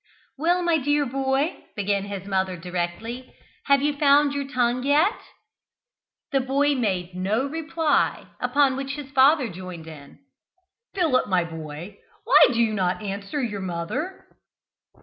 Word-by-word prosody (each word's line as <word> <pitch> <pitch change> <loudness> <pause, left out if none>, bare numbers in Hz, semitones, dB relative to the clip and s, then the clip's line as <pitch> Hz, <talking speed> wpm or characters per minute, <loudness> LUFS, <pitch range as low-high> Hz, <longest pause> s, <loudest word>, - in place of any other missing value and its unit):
"Well, 345 +5 +1
my 335 -2 +2
dear 290 +1 +1
boy," 270 +4 0 0.2
began 200 -1 -1
his 200 -2 -6
mother 190 -2 -1
directly, 180 +8 -5 0.3
"have 280 -1 +3
you 295 0 +2
found 285 0 +4
your 280 -1 -3
tongue 250 -2 0
yet?" 295 - +3 1.2
The 275 - +2
boy 275 +3 +1
made 190 -8 -1
no 200 +8 0
reply, 320 +1 0
upon 280 -2 +2
which 275 +1 -4
his 285 -2 -8
father 275 0 +5
joined 180 -4 -8
in. 150 -3 -12 0.8
"Philip, 320 -9 +2
my 185 -2 +2
boy, 165 +3 -8 0.2
why - - +6
do 230 -2 +1
not 185 0 -1
you 205 - -3
answer 200 +9 -4
your 205 -4 -3
mother?" 185 - -4
250 Hz, 140 wpm, -24 LUFS, 190-285 Hz, 1.2 s, why